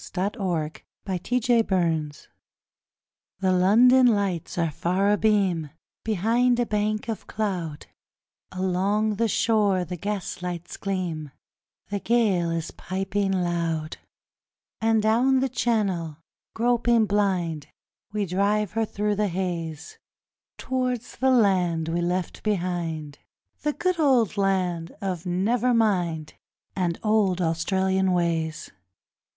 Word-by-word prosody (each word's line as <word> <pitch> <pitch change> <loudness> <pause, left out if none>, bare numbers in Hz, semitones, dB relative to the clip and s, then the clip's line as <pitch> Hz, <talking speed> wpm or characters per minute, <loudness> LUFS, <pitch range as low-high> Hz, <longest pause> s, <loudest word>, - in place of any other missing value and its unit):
The 195 +3 -1
Old 165 -5 -2 0.3
Australian 230 +5 +1
Ways 160 -6 -1 1.1
The 190 -1 +2
London 240 +8 +5
lights 200 -8 0
are 165 -2 +1
far 185 +7 +1
abeam 200 -7 +2 0.3
Behind 230 +4 +2
a 240 - +2
bank 210 0 -1
of 225 -2 -5
cloud, 180 -8 -3 0.7
Along 195 +3 0
the 230 - +2
shore 205 -4 +2
the 180 +2 -6
gaslights 180 -3 -4
gleam, 175 -6 -3 0.6
The 205 0 -2
gale 200 -7 +2
is 165 -1 -3
piping 195 +1 -2
loud; 170 -3 -1 0.8
And 225 -1 +2
down 245 +5 +3
the 265 - +1
Channel, 195 - -1 0.4
groping 235 -1 +3
blind, 185 -7 0 0.4
We 210 -1 -1
drive 200 +2 +1
her 225 +1 0
through 210 -1 -2
the 210 0 +1
haze 170 -4 -4 0.6
Towards 255 -2 -2
the 265 - +2
land 185 -9 +2
we 170 +1 0
left 180 0 -2
behind 170 -7 -2 0.4
The 300 - 0
good 365 +1 -1
old 255 - +3
land 185 -4 0
of 185 -3 -4
'never 230 +7 +1
mind', 175 -8 0 0.4
And 175 -3 -1
old 210 -4 +2
Australian 190 +3 +1
ways. 165 -2 -1
190 Hz, 110 wpm, -25 LUFS, 175-220 Hz, 1.1 s, London